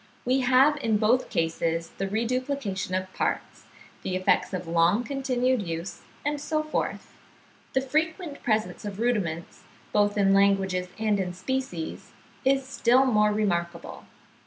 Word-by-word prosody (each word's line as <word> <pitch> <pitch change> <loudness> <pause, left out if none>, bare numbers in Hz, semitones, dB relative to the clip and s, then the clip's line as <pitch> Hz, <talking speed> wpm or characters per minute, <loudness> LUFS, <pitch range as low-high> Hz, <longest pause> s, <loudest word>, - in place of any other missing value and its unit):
We 255 +2 +3
have 265 +3 +4
in 225 -6 +1
both 230 +4 +2
cases 165 0 -1
the 195 - 0
reduplication 230 -3 -2
of 185 0 -3
parts, - - -3 0.4
the 185 - -3
effects 185 0 +2
of 185 -2 -4
long 170 +7 +3
continued 260 -2 0
use, 170 0 -5 0.2
and 290 0 -1
so 310 +1 -1
forth. 310 - -3 0.6
The 265 - +2
frequent 315 +3 -2
presence 215 -2 -1
of 205 -1 -6
rudiments, 200 -9 -1 0.3
both 205 0 +2
in 195 -1 +4
languages 195 -2 +3
and 215 -2 +1
in 180 -2 -2
species, 185 -5 -4 0.3
is 270 0 +2
still 260 -1 +3
more 210 -4 +3
remarkable. 175 -5 -2
215 Hz, 135 wpm, -26 LUFS, 185-260 Hz, 0.6 s, have